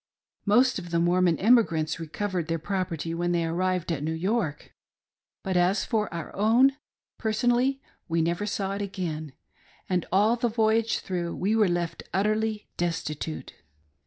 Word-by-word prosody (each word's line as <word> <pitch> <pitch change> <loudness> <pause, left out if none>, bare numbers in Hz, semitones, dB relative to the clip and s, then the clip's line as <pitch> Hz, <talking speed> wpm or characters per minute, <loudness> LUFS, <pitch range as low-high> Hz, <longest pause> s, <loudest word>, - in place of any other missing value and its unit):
Most 245 +3 +4
of 175 -1 -9
the 170 - 0
Mormon 175 -1 +3
emigrants 185 -9 +3
recovered 175 +1 -3
their 165 0 0
property 165 -2 -3
when 175 +1 0
they 170 -1 +1
arrived 180 +1 -1
at 155 -4 -2
New 160 +2 -2
York, 185 -3 -2 0.7
but 190 -1 -2
as 180 +3 +2
for 215 -3 -1
our 170 -2 -6
own, 240 +6 +4 0.4
personally, 245 +4 +1 0.3
we 165 0 +1
never 170 +5 0
saw 195 -1 -2
it 200 - -3
again, 165 -7 -4 0.5
and 180 -2 0
all 210 +5 +4
the 240 0 0
voyage 225 0 +2
through 175 -2 -3
we 205 +4 0
were 215 -4 +4
left 170 -1 -2
utterly 215 +2 0
desti 165 -3 -2
tute. 160 - -6
185 Hz, 155 wpm, -27 LUFS, 170-215 Hz, 0.7 s, Most